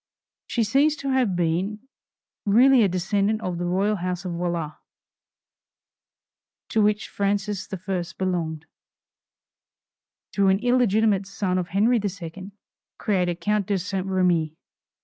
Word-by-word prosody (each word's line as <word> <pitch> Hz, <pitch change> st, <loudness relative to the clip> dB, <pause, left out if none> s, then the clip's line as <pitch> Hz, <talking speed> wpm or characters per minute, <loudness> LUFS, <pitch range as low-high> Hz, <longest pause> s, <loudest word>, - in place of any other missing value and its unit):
She 235 Hz, -, 0 dB
seems 280 Hz, +8 st, +3 dB
to 275 Hz, -2 st, -3 dB
have 250 Hz, -8 st, +2 dB
been 185 Hz, +7 st, -1 dB, 0.6 s
really 245 Hz, +5 st, +5 dB
a 210 Hz, -, +5 dB
descendant 200 Hz, +4 st, 0 dB
of 180 Hz, -4 st, -3 dB
the 175 Hz, -, -2 dB
royal 200 Hz, +4 st, +1 dB
house 180 Hz, +1 st, -3 dB
of 180 Hz, -, -3 dB
Valois, 170 Hz, -2 st, -2 dB, 2.0 s
to 220 Hz, -, +2 dB
which 210 Hz, 0 st, +1 dB
Francis 200 Hz, 0 st, -2 dB
I. 185 Hz, -1 st, -3 dB
belonged; 165 Hz, -4 st, -2 dB, 1.7 s
through 200 Hz, -1 st, +2 dB
an 190 Hz, 0 st, +4 dB
illegitimate 220 Hz, -4 st, +2 dB
son 190 Hz, -2 st, -1 dB
of 175 Hz, -, -3 dB
Henry 215 Hz, +7 st, +2 dB
II. 190 Hz, -1 st, -6 dB, 0.5 s
created 180 Hz, -4 st, -1 dB
Count 210 Hz, -2 st, 0 dB
de 200 Hz, -, +1 dB
St. 190 Hz, +1 st, -3 dB
Remi. 175 Hz, -5 st, +1 dB
195 Hz, 125 wpm, -24 LUFS, 180-210 Hz, 2.0 s, really